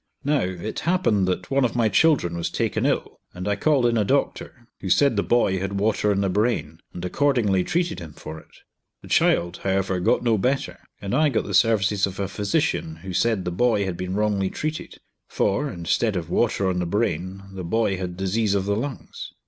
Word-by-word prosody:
Now, 145 Hz, +1 st, +2 dB
it 95 Hz, +4 st, -4 dB
happened 165 Hz, -, +1 dB
that 90 Hz, -1 st, -3 dB
one 135 Hz, 0 st, +3 dB
of 125 Hz, -, 0 dB
my 115 Hz, -2 st, +3 dB
children 110 Hz, -, +3 dB
was 85 Hz, -1 st, -2 dB
taken -, -, -1 dB
ill, -, -, -2 dB, 0.2 s
and 90 Hz, +2 st, -5 dB
I 100 Hz, -, +1 dB
called 145 Hz, -2 st, +2 dB
in 120 Hz, -1 st, +2 dB
a -, -, +3 dB
doctor, 130 Hz, 0 st, -2 dB
who 95 Hz, -, -5 dB
said 135 Hz, +7 st, +4 dB
the 100 Hz, -, +2 dB
boy 100 Hz, -6 st, +2 dB
had 95 Hz, +1 st, -3 dB
water 105 Hz, 0 st, +1 dB
on 100 Hz, -1 st, +1 dB
the 100 Hz, -, +1 dB
brain, 100 Hz, -6 st, -1 dB
and 90 Hz, 0 st, -6 dB
accordingly 105 Hz, -4 st, +2 dB
treated 170 Hz, -, -1 dB
him 80 Hz, -4 st, -9 dB
for 80 Hz, +2 st, -9 dB
it. -, -, -20 dB, 0.5 s
The -, -, -12 dB
child, 85 Hz, +1 st, +2 dB
however, 95 Hz, -1 st, -1 dB
got 90 Hz, -, +2 dB
no 115 Hz, -3 st, +2 dB
better, 130 Hz, +6 st, -1 dB, 0.2 s
and 100 Hz, +1 st, -5 dB
I 150 Hz, +3 st, +4 dB
got 125 Hz, -, 0 dB
the 100 Hz, -, -5 dB
services 100 Hz, 0 st, +3 dB
of 95 Hz, 0 st, -8 dB
a 100 Hz, -, -1 dB
physician 100 Hz, -5 st, -1 dB
who 95 Hz, -1 st, -6 dB
said 110 Hz, -1 st, +1 dB
the 90 Hz, -, -2 dB
boy 105 Hz, +1 st, +2 dB
had 95 Hz, -2 st, -3 dB
been 90 Hz, +1 st, -4 dB
wrongly 105 Hz, -2 st, +1 dB
treated, 155 Hz, +7 st, -5 dB, 0.3 s
for, 130 Hz, +9 st, 0 dB
instead 95 Hz, +4 st, -1 dB
of 85 Hz, -2 st, -4 dB
water 105 Hz, -4 st, +1 dB
on 90 Hz, -1 st, 0 dB
the 90 Hz, -, -1 dB
brain 95 Hz, -1 st, -2 dB
the 95 Hz, -1 st, -6 dB
boy 100 Hz, +2 st, 0 dB
had 90 Hz, -1 st, -5 dB
disease 100 Hz, +2 st, 0 dB
of 95 Hz, -1 st, 0 dB
the 100 Hz, 0 st, 0 dB
lungs. 130 Hz, +3 st, -6 dB
100 Hz, 210 wpm, -23 LUFS, 90-120 Hz, 0.5 s, said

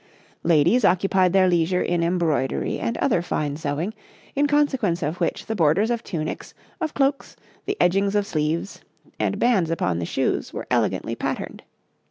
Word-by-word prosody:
Ladies 170 Hz, -, +3 dB
occupied 185 Hz, -1 st, +3 dB
their 190 Hz, 0 st, +4 dB
leisure 175 Hz, +1 st, +2 dB
in 175 Hz, -1 st, 0 dB
embroidery 170 Hz, -6 st, 0 dB
and 230 Hz, -, -2 dB
other 220 Hz, -11 st, +1 dB
fine 150 Hz, -4 st, -2 dB
sewing, 155 Hz, +6 st, -3 dB, 0.4 s
in 290 Hz, +1 st, +3 dB
consequence 265 Hz, -, +1 dB
of 155 Hz, +4 st, -3 dB
which -, -, -1 dB
the 225 Hz, -, -3 dB
borders 185 Hz, +6 st, +2 dB
of 235 Hz, -1 st, -2 dB
tunics, 155 Hz, -4 st, -5 dB, 0.3 s
of 315 Hz, -2 st, -2 dB
cloaks, 275 Hz, 0 st, 0 dB, 0.3 s
the 405 Hz, -, -1 dB
edgings 195 Hz, +3 st, +2 dB
of 205 Hz, -1 st, +2 dB
sleeves, 165 Hz, 0 st, -2 dB, 0.4 s
and -, -, 0 dB
bands 205 Hz, -9 st, +2 dB
upon 95 Hz, -, 0 dB
the 85 Hz, -, -2 dB
shoes, -, -, -1 dB
were -, -, -4 dB
elegantly -, -, 0 dB
patterned. -, -, -4 dB
180 Hz, 160 wpm, -23 LUFS, 160-220 Hz, 0.4 s, their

